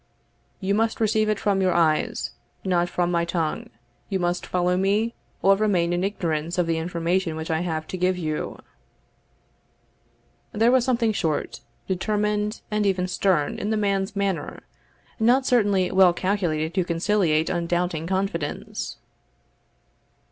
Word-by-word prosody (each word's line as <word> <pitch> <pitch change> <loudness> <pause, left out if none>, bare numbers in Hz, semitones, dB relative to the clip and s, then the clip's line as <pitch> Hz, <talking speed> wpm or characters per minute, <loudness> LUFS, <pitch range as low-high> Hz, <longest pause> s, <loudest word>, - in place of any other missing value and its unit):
"You 195 0 0
must 225 +2 +1
receive 215 -1 +2
it 215 - 0
from 200 -2 +1
your 185 -1 +2
eyes, 160 -3 +1 0.3
not 175 -2 +1
from 175 0 0
my 170 -1 +1
tongue 170 -2 -2 0.4
you 195 - 0
must 175 0 -1
follow 180 0 +1
me, 205 +5 +1 0.3
or 195 +1 +6
remain 185 -5 +1
in 175 +1 0
ignorance 170 -4 -2
of 180 - +2
the 165 -1 0
information 170 0 -1
which 160 +1 -4
I 160 - +1
have 160 -2 -2
to 185 - -4
give 180 0 +1
you." 155 -3 -3 2.0
There 225 +2 +3
was 255 -2 +4
something 235 -3 +2
short, 160 -6 -2 0.3
determined, 210 +2 -1
and 210 0 +1
even 185 -2 +1
stern, 180 -5 +1
in 205 - -2
the 220 - +1
man's 200 -1 0
manner, 200 -3 -2 0.6
not 245 +4 +4
certainly 205 -7 +2
well 185 -2 +6
calculated 175 -5 -1
to 185 0 +1
conciliate 170 -2 +1
undoubting 175 -1 -1
confidence. 190 -5 -3
185 Hz, 140 wpm, -24 LUFS, 170-205 Hz, 2.0 s, or